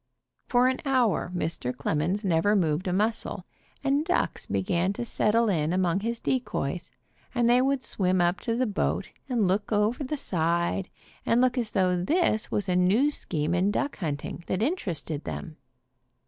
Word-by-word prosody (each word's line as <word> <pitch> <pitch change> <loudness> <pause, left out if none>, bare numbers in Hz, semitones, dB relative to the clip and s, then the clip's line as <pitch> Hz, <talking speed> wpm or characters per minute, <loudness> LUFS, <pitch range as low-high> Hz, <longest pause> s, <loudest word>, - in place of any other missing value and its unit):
For 245 0 +3
an 260 0 0
hour 250 -10 +1
Mr. 160 -7 -2
demons 175 +7 -1
never 185 +4 +3
moved 170 -1 +1
a - - 0
muscle, 215 +5 -1 0.4
and 280 +2 +2
ducks 350 +3 -1
began 185 0 0
to 235 - -4
settle 230 0 +2
in 160 -6 +1
among 180 0 +1
his 230 +2 -2
de 260 - +1
coys, 170 - -4 0.5
and 240 -1 +3
they 245 +1 +5
would 270 0 +1
swim 185 -1 0
up 175 +2 +2
to 230 -2 -2
the 255 +2 +1
boat 205 -4 -1 0.2
and 230 -6 +2
look 200 +4 0
over 215 +6 +1
the 295 +3 -3
side 170 - 0 0.3
and 230 - +2
look 255 0 +3
as 240 -4 0
though 180 -2 +2
this 260 - +1
was 205 - -1
a 180 - +1
new 205 +11 +3
scheme 155 - -2
in 180 +3 +2
duck 280 +7 -1
hunting 155 0 -4
that 185 - 0
interested 175 - -2
them. 75 -2 -6
200 Hz, 175 wpm, -27 LUFS, 175-240 Hz, 0.5 s, they